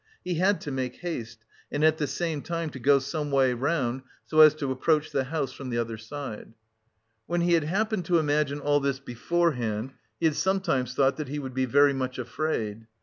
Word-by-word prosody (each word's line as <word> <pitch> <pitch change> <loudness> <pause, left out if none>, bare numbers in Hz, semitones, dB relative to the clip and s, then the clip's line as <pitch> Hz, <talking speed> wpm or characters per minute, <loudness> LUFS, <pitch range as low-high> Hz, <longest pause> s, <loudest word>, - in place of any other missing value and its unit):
He 175 -3 -2
had 190 -1 +2
to 145 - -5
make 130 -2 -3
haste 120 -10 -6 0.3
and 145 - -1
at 155 0 +4
the 150 - 0
same 155 +2 -2
time 165 -1 -3
to 130 - -8
go 140 +3 +5
someway 140 -2 +1
round, 130 -1 -1 0.2
so 155 - 0
as 155 -1 +9
to 140 -3 -3
approach 150 +4 +1
the 135 -1 0
house 140 0 -2
from 135 -2 -7
the 120 - -2
other 115 -1 -2
side.... 115 -2 -7 0.7
When 175 0 0
he 175 0 +3
had 165 -3 +3
happened 205 +2 0
to 175 0 +3
imagine 150 -2 +1
all 145 0 +3
this 140 -1 -1
beforehand, 125 -4 -1 0.3
he - - 0
had 155 -2 +3
sometimes 165 -11 0
thought 135 0 +3
that 155 -3 -4
he 145 +3 -4
would 135 -3 -5
be 130 0 +1
very 140 +3 +4
much 130 -1 -3
afraid. 115 -4 -3
145 Hz, 205 wpm, -27 LUFS, 130-160 Hz, 0.7 s, as